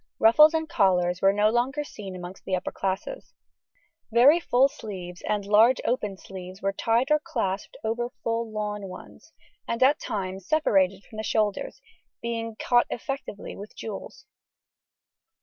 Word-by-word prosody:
Ruffs 300 +9 +7
and 320 0 -1
collars 180 - +2
were 195 - +6
no 210 +2 +3
longer 260 +5 0
seen 195 -9 -9
amongst 180 +1 -9
the 185 - -1
upper 180 - -3
classes. 195 - -4 0.8
Very 265 +9 +6
full 265 -5 +4
sleeves 185 -8 -8
and 210 -2 0
large 220 +5 +5
opened 210 -6 -1
sleeves 185 -1 -9
were 195 0 -1
tied 230 +7 +1
or 300 - +5
clasped 200 - -3
over 235 +2 -1
full 230 0 -1
lawn 210 -2 -3
ones, 185 0 -12 0.4
and 230 +2 +1
at 285 +3 +4
times 190 -2 -4
separated 195 -11 +2
from 215 - -13
the 220 - -3
shoulders, 210 -2 -1 0.4
being 230 -1 -4
caught 240 -1 +3
effectively 270 -4 -5
with 205 +2 -10
jewels. 215 -3 -7
215 Hz, 150 wpm, -26 LUFS, 195-240 Hz, 0.8 s, Ruffs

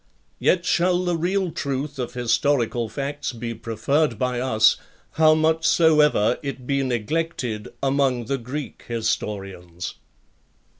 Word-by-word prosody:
Yet 180 -1 +2
shall 180 +1 +2
the 175 -1 +1
real 180 +2 0
truth 140 0 -3
of 125 - -4
historical 120 -1 +1
facts 140 +3 -4
be 115 0 -5
preferred 115 +4 0
by 125 +1 -1
us, 110 -3 +4 0.3
how 155 -1 +5
much 160 +1 +2
soever 150 -9 +4
it 140 -3 -6
be 140 +1 0
neglected 125 -2 -2 0.2
among 135 -3 +1
the 135 +2 -2
Greek 130 +4 -6
historians. 95 -6 -3
135 Hz, 120 wpm, -23 LUFS, 115-155 Hz, 0.3 s, how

